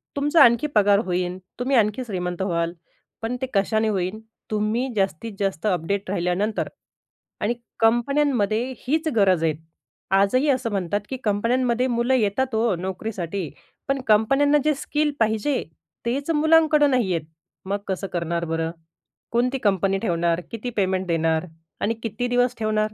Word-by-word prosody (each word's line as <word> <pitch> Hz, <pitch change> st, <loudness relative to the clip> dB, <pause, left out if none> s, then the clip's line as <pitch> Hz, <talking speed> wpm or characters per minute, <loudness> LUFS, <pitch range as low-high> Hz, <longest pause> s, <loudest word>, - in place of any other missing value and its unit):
तुमचा 295 Hz, +3 st, +5 dB
आणखी 235 Hz, +5 st, +4 dB
पगार 205 Hz, -1 st, +5 dB
होईन. 180 Hz, 0 st, -1 dB, 0.2 s
तुम्ही 260 Hz, +2 st, +1 dB
आणखी 215 Hz, +3 st, +2 dB
श्रीमंत 180 Hz, -4 st, -3 dB
व्हाल. 170 Hz, -3 st, 0 dB, 0.5 s
पण 225 Hz, +2 st, -2 dB
ते -, -, +1 dB
कशाने 215 Hz, +2 st, +2 dB
होईल 190 Hz, +1 st, -2 dB, 0.3 s
तुम्ही 215 Hz, +4 st, 0 dB
जास्तीत 195 Hz, +2 st, -1 dB
जास्त 195 Hz, -3 st, -2 dB
अपडेट 190 Hz, +1 st, -1 dB
राहिल्यानंतर. 190 Hz, +3 st, -1 dB, 0.7 s
आणि 220 Hz, +3 st, +1 dB, 0.3 s
कंपन्यांमध्ये 240 Hz, -2 st, +2 dB
हीच 310 Hz, +7 st, -1 dB
गरज 190 Hz, -6 st, +3 dB
आहे. 160 Hz, -1 st, +2 dB, 0.6 s
आजही 200 Hz, +9 st, +3 dB
असं 255 Hz, -4 st, +1 dB
म्हणतात, 200 Hz, 0 st, -1 dB
की 265 Hz, -, -3 dB
कंपन्यांमध्ये 235 Hz, +4 st, +1 dB
मुलं 240 Hz, +1 st, +1 dB
येतात 235 Hz, +2 st, 0 dB
हो 220 Hz, -2 st, +2 dB
नोकरीसाठी. 185 Hz, -1 st, -4 dB, 0.4 s
पण 275 Hz, -1 st, 0 dB
कंपन्यांना 275 Hz, +7 st, +4 dB
जे 305 Hz, -, +4 dB
स्किल 295 Hz, +2 st, -1 dB
पाहिजे 225 Hz, +5 st, +1 dB, 0.4 s
तेच 275 Hz, +6 st, -1 dB
मुलांकडं 310 Hz, -1 st, +4 dB
नाही 235 Hz, -8 st, +2 dB
आहेत. 160 Hz, -2 st, -3 dB, 0.4 s
मग 200 Hz, +2 st, -1 dB
कसं 195 Hz, 0 st, -2 dB
करणार 170 Hz, -1 st, -1 dB
बरं? 165 Hz, 0 st, -2 dB, 0.6 s
कोणती 250 Hz, +3 st, +1 dB
कंपनी 195 Hz, -4 st, +1 dB
ठेवणार? 170 Hz, -4 st, 0 dB
किती 230 Hz, +2 st, -4 dB
पेमेंट 190 Hz, -1 st, 0 dB
देणार? 165 Hz, 0 st, +1 dB, 0.4 s
आणि 225 Hz, -, +1 dB
किती 225 Hz, +2 st, -2 dB
दिवस 245 Hz, 0 st, +2 dB
ठेवणार? 215 Hz, -1 st, 0 dB
215 Hz, 140 wpm, -23 LUFS, 190-250 Hz, 0.7 s, तुमचा